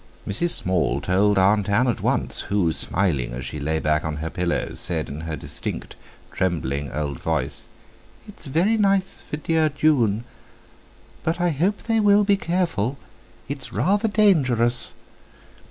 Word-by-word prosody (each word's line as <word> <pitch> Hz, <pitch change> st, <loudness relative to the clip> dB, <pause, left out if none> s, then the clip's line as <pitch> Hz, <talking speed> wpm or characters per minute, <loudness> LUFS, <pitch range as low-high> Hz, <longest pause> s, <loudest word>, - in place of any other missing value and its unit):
Mrs. 110 Hz, -, +1 dB
Small 95 Hz, -, +2 dB
told 100 Hz, +3 st, +2 dB
Aunt 100 Hz, +1 st, +3 dB
Ann 120 Hz, +6 st, +2 dB
at 120 Hz, -, -1 dB
once, -, -, +1 dB
who, 95 Hz, -5 st, +1 dB
smiling 80 Hz, -12 st, +1 dB
as 60 Hz, +1 st, -6 dB
she 70 Hz, +4 st, -5 dB
lay 80 Hz, +3 st, -1 dB
back 75 Hz, -1 st, 0 dB
on 80 Hz, -1 st, -3 dB
her 80 Hz, +2 st, -5 dB
pillows, 90 Hz, -1 st, -2 dB
said -, -, -2 dB
in 75 Hz, +3 st, -6 dB
her 80 Hz, -1 st, -4 dB
distinct, -, -, -4 dB, 0.4 s
trembling 70 Hz, -6 st, -2 dB
old 70 Hz, -2 st, -4 dB
voice: -, -, -2 dB, 0.6 s
"It's 210 Hz, -7 st, -8 dB
very 175 Hz, +11 st, +2 dB
nice 195 Hz, -2 st, +1 dB
for 150 Hz, -, -6 dB
dear 160 Hz, +1 st, +1 dB
June; 130 Hz, -8 st, +1 dB, 1.0 s
but 165 Hz, +2 st, -2 dB
I 175 Hz, 0 st, +1 dB
hope 180 Hz, +8 st, -1 dB
they 225 Hz, -1 st, +1 dB
will 205 Hz, -1 st, +5 dB
be 200 Hz, 0 st, +3 dB
careful—it's 140 Hz, -, -4 dB
rather 200 Hz, -, +1 dB
dangerous!" 130 Hz, -, +3 dB
115 Hz, 145 wpm, -23 LUFS, -, 1.0 s, will